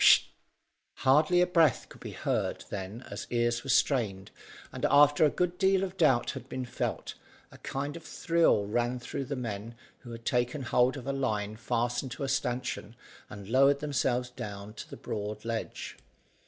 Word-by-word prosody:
Pst!" - - +8 0.7
Hardly 155 +6 +4
a - - +5
breath 165 -7 +3
could - - -15
be - - -7
heard - - -2
then 100 +5 -6
as - - -6
ears 120 0 +1
were 135 - -7
strained, 110 -8 +1 0.4
and - - -8
after 145 +1 +6
a - - +5
good 180 +3 -1
deal 190 0 +3
of 190 -1 -4
doubt 140 -9 +3
had 130 -1 -9
been 130 -1 -4
felt, 120 - -3 0.4
a - - -14
kind 145 +2 -4
of 170 - -7
thrill 165 -11 +2
ran 120 +4 0
through 135 +3 -5
the 140 - -3
men 115 -2 -5 0.2
who 120 - -12
had 115 0 -9
taken 125 +3 0
hold 125 +2 +2
of 130 - -8
a 140 - -1
line 110 -6 -1
fastened 120 +3 -1
to 130 - -6
a - - -1
stanchion 125 -4 -2 0.3
and 100 -1 -9
lowered 135 +3 +5
themselves 130 -4 0
down 105 -3 -7
to 110 - -9
the - - -8
broad 105 +1 -5
ledge. 115 -1 -4
125 Hz, 180 wpm, -30 LUFS, 115-145 Hz, 0.7 s, Pst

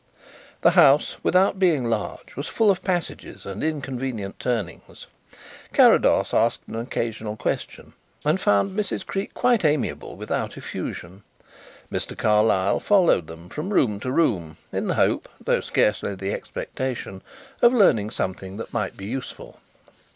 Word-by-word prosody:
The - - +5
house, 140 +2 +5
without 190 +1 +3
being 165 -9 +3
large, 110 -3 -4
was 140 - -4
full 220 -3 +3
of 190 -1 -2
passages 180 -3 -3
and 100 +1 -5
inconvenient 130 -9 -3
turnings. 110 -9 -4 0.7
Carrados - - +5
asked 115 0 +2
an - - -9
occasional 110 -2 -3
question - - -4 0.3
and 155 +6 +2
found 105 - +2
Mrs. 210 -1 -2
Creake 195 +1 -4
quite 240 -5 +2
amiable 150 -2 0
without - - -3
effusion. 90 +3 -6 0.7
Mr. - - -4
Carlyle 105 -2 +3
followed 180 - +3
them 80 +2 -11
from 150 - -5
room 105 - +2
to 125 - -3
room 90 - 0 0.2
in - - -2
the - - 0
hope, - - +1
though - - +1
scarcely 100 -1 0
the 95 +1 -3
expectation, 120 -7 -5 0.4
of 240 - +7
learning 135 - +4
something 95 -1 -4
that 115 - -7
might 105 -5 -2
be 95 - -8
useful. 125 +5 -7
120 Hz, 140 wpm, -24 LUFS, 100-160 Hz, 0.7 s, of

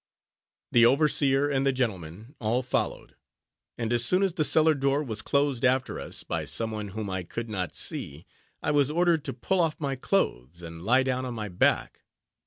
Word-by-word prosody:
The 120 - +5
overseer, 140 +1 +3
and 135 -2 0
the 135 - +3
gentlemen, 110 - -4
all 120 +3 0
followed; 125 - -3 0.6
and 115 0 -2
as 120 -1 +3
soon 185 +10 +3
as 190 -3 +1
the 165 -3 0
cellar 155 +1 +4
door 140 +1 0
was 110 -6 -3
closed 140 -3 0
after 130 0 +1
us, - - -6
by - - -3
some 115 -1 -2
one 105 -1 -4
whom 105 +2 -5
I 95 -1 -3
could 115 +6 -6
not 90 -4 -3
see, 70 +3 -2 0.4
I - - +1
was 145 -2 +3
ordered 170 -1 +2
to - - -3
pull 180 +11 -1
off 165 -3 0
my 140 -3 -2
clothes, 85 - -1
and 85 0 -8
lie 125 +8 +3
down 130 -1 -1
on 125 -2 -5
my 105 -2 -4
back. 90 - +1
125 Hz, 195 wpm, -27 LUFS, 110-145 Hz, 0.6 s, The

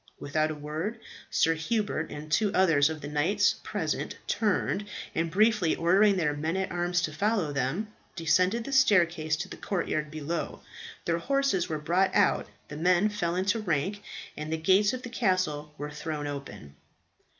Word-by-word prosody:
Without 155 +2 0
a 155 - -4
word, 155 +9 -4 0.3
Sir 165 - +3
Hubert 205 0 -1
and 150 +1 -8
two 205 +6 +2
others 160 -6 +4
of 155 -1 -5
the 145 - -6
knights 160 +8 +2
present - - -3
turned, 210 -1 0 0.3
and 165 +1 0
briefly 210 -2 +3
ordering 195 +4 +4
their 150 -5 +1
men 160 +5 -2
at 190 -1 -2
arms 175 0 0
to 155 - -2
follow 200 -3 0
them, 160 +11 -2 0.2
descended 180 +6 +2
the 275 - -6
staircase 170 - +3
to 180 +5 -5
the - - -9
courtyard 155 -5 -2
below. 155 +2 -4 0.4
Their 170 0 +1
horses 275 -6 +1
were 155 - -1
brought 180 +5 +1
out, 205 - +3 0.2
the 150 - -8
men 180 +5 +3
fell 175 -5 -2
into 195 +5 +1
rank, 190 +1 -1 0.3
and 155 +1 -5
the 160 - 0
gates 190 +6 +4
of 255 0 -5
the 245 - -6
castle 185 -10 -1
were 150 +1 -5
thrown 150 0 -4
open. 105 - -7
170 Hz, 170 wpm, -28 LUFS, 155-200 Hz, 0.4 s, others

